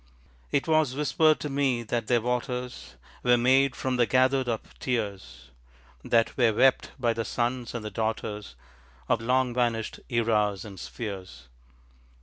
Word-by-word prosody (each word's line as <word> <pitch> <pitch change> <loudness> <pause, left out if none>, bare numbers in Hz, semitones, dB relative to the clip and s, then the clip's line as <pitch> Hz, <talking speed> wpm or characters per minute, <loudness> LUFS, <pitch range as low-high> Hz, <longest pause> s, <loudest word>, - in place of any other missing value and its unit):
It 140 - +1
was 155 -5 +2
whispered 155 +1 +3
to - - -2
me 135 -4 +1
that 115 0 -2
their 120 -2 +3
waters 125 +1 -3 0.3
Were 125 0 +4
made 130 +2 +3
from 130 +1 -2
the 120 -1 +3
gathered 130 +2 +2
up 115 -2 -2
tears, 100 - -4 0.5
That 115 -1 +2
were 120 -3 +4
wept 130 +4 +3
by 120 -3 +1
the 115 0 -2
sons 120 +1 -2
and 115 -2 -4
the 105 - -4
daughters 105 - -3 0.5
Of - - +1
long 125 +1 +1
vanished 120 -3 -1
eras 105 -5 +1
and 100 -3 -10
spheres. 95 - -7
120 Hz, 145 wpm, -27 LUFS, 110-130 Hz, 0.5 s, Were